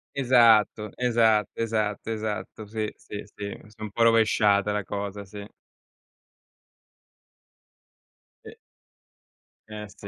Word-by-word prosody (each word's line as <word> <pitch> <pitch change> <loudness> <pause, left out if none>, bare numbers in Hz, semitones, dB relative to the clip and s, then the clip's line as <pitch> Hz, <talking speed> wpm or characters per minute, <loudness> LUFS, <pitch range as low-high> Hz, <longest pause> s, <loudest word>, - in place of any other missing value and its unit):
Esatto, 115 -5 +4
esatto, 115 -4 +3
esatto, 110 -1 -2
esatto, 110 0 -5
sì, 110 0 -3
sì, 105 0 -8
sì, 100 -1 -6
si 105 - -19
è 110 - -17
un 110 - -5
po' 115 +3 +1
rovesciata 105 -3 +3
la 105 -1 -1
cosa, 100 0 -5
sì. 100 +1 -10 3.0
E - - -10 1.1
Eh 105 -1 -7
sì, 100 - -12
105 Hz, 105 wpm, -26 LUFS, 105-115 Hz, 3.0 s, Esatto